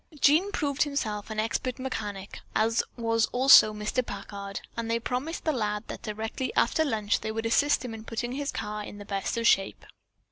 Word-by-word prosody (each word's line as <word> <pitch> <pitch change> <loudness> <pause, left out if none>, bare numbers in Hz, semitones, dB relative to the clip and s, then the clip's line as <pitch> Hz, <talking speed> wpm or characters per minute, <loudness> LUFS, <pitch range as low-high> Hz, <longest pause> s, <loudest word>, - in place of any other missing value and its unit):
Jean 320 +9 +4
proved 285 -7 -1
himself 225 -9 -1
an 215 -1 -3
expert 230 +3 -1
mechanic, 210 -7 -5 0.2
as 225 +2 +3 0.2
was 230 -1 +1
also 255 -4 +7
Mr. 210 +4 -1
Packard, 200 -2 -6 0.2
and 230 -1 -3
they 230 0 +1
promised 255 +8 -3
the 315 - +3
lad 210 -5 -1
that - - -6
directly 220 +4 -4
after 315 +6 +3
lunch 215 -8 0
they 220 - -4
would 225 +1 -3
assist 285 +4 +2
him 235 - -5
in 220 -1 -8
putting 240 +2 -4
his 280 +2 -3
car 210 0 -4
in 205 - -9
the 205 - -9
best 200 +2 -2
of 230 - -1
shape. 195 -4 +2
225 Hz, 190 wpm, -28 LUFS, 210-255 Hz, 0.2 s, also